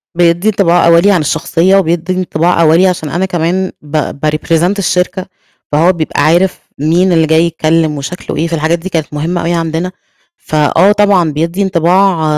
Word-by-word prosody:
بيدِّي 175 +3 +1
انطباع 175 -5 +2
أوَّلي 170 +4 +4
عن 180 -5 +2
الشخصية 165 +4 0
وبيدِّي 175 -1 0
انطباع 175 -1 0
أوَّلي، 165 +4 +4
عشان 165 -5 -2
أنا 175 +6 -1
كمان 180 +1 -2
ب 150 0 -3 0.2
بrepresent 165 +4 0
الشركة، 180 0 -1 0.5
فهو 165 +5 +3
بيبقى 155 -3 -3
عارف 175 +4 +1 0.2
مين 170 +5 +1
اللي 165 -2 +2
جاي 160 +2 +3
يتكلم 160 -2 0
وشكلُه 145 +4 -6
إيه، 165 - -1
فالحاجات 165 +1 -1
دي 190 - -7
كانت 160 -4 -2
مهمة 165 +4 -2
أوي 170 +1 -1
عندنا. 165 +2 -2 0.5
فآه 155 +6 +1
طبعًا 200 -6 +2
بيدّي 165 +6 -2
انطباع 180 -1 +1
170 Hz, 160 wpm, -12 LUFS, 160-185 Hz, 0.5 s, أوَّلي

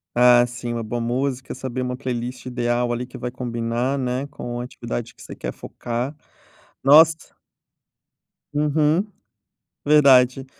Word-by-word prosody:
Ah, 120 0 +6
sim, 120 0 -5
uma 115 - -3
boa 120 +2 -3
música, 130 +2 -2
saber 130 -1 -5
uma 125 0 -3
playlist 125 0 -5
ideal 120 -1 0
ali 120 +1 -2
que 125 - -16
vai 125 0 -4
combinar, 120 +1 -2
né, 130 0 -2
com 120 -4 -6
a - - -3
atividade - - -6
que - - -19
você - - -9
quer - - -5
focar. 120 +5 -5 0.7
Nossa 160 +3 +5 1.2
Uhum. 150 +4 +2 0.8
Verdade. 135 -3 +5
125 Hz, 135 wpm, -22 LUFS, 120-135 Hz, 1.2 s, Ah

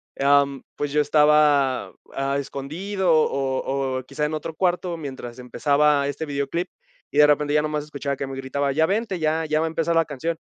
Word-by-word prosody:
em, 140 -1 +3
pues, 145 -1 -3
yo 150 - +3
estaba, 150 -2 +3 0.2
ah, 135 0 -1
escondido, 170 +8 -2
o 135 -2 0
o, 130 - -5
quizá 140 +3 -3
en 150 - -3
otro 155 +1 -5
cuarto 180 0 -1
mientras 130 -5 -7
empezaba 140 +3 +2
este 145 +3 -4
videoclip, 145 +5 -2 0.4
y - - -6
de 150 0 +8
repente 145 0 +2
ya 150 - +4
nomás 150 -1 -2
escuchaba 140 -2 -4
que 135 - -4
me 135 - -6
gritaba: 140 +1 -2
"Ya 160 +3 +3
vente, 200 0 -1
ya 160 +1 0
ya 155 0 +1
va 160 - +1
a 160 - -1
empezar 165 +1 -1
la 165 -1 +4
canción", 160 +3 -3
145 Hz, 195 wpm, -23 LUFS, 140-160 Hz, 0.4 s, de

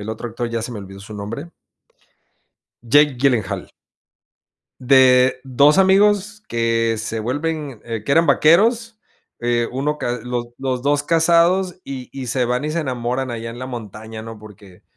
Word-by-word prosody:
el 105 - -8
otro 110 +2 -5
actor, 120 +1 -4
ya 115 -1 -3
se 120 - -5
me 110 - -6
olvidó 95 0 -10
su 105 +2 -10
nombre. 115 +11 -7 1.3
Jake 145 +2 +4
Gyllenhaal. 120 -7 0 1.1
De 130 -1 +5
2 140 +6 +4
amigos 205 +2 +3
que 115 -1 0
se 110 0 -4
vuelven, 145 0 -3
eh, 115 -2 -5
que 140 - 0
eran 165 +2 +4
vaqueros, 225 +7 +3 0.4
eh, 120 -1 0
1 145 +4 -2
ca 120 0 -2
los 125 -1 -3
los 130 -2 -2
2 145 +1 +1
casados 170 +3 +2
y 130 -2 -7
y 135 -2 -6
se 125 +1 0
van 125 +3 -1
y 150 - -2
se 170 - -1
enamoran 130 -2 -3
allá 115 0 -5
en 120 - -10
la 130 - -5
montaña, 110 -2 -8
¿no? 115 0 -9
Porque 100 -3 -15
125 Hz, 165 wpm, -20 LUFS, 115-150 Hz, 1.3 s, De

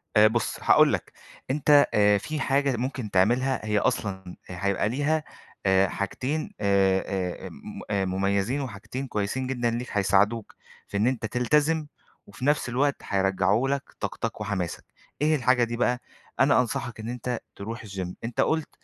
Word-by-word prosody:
آآ، 105 0 +8
بُص 115 +1 -1
هاقول - - +6
لَك، - - -3 0.4
أنت، 145 0 +5
آآ، 105 0 +5
في 155 +10 -4
حاجة 135 -1 +1
ممكن 125 -3 -3
تعملها 120 +6 +2
هي 105 -1 +1
أصلًا 95 -2 -1 0.3
آآ، 90 - -6
هيبقى 100 +1 +1
ليها، 145 +5 0 0.4
آآ، 95 0 +4
حاجتين، 130 - -3
آآ، 100 -2 +3
آآ، 95 -2 -3
آآ، - - -6
م - - -10
آآ، 100 -2 +1
مُميزين 100 +8 0
وحاجتين 125 +3 -6
كويسين 110 +5 -2
جدًا 120 -3 0
ليك، 120 +2 -3
هيساعدوك 100 +2 +1 0.3
في 100 - -3
إن 110 +4 +2
أنت 130 -3 -1
تلتزم 150 +7 +1 0.4
وفي 100 +6 -7
نفْس 145 -4 +2
الوقت 140 +4 +1
هيرجّعوا 95 +5 +1
لك 140 0 0 0.2
طاقتك 115 -2 -4
وحماسك. 100 -5 -3 0.4
إيه 155 +1 +3
الحاجة 125 -2 +3
دي 120 0 -2
بقى؟ 125 0 +1 0.4
أنا 135 0 +5
أنصحك 120 0 -4
إن 110 +2 -5
أنت 125 0 -3 0.2
ترُوح 110 +2 -6
الGym 95 -3 -4 0.2
أنت 115 0 -1
قُلت، 160 -1 0
115 Hz, 165 wpm, -26 LUFS, 100-130 Hz, 0.4 s, آآ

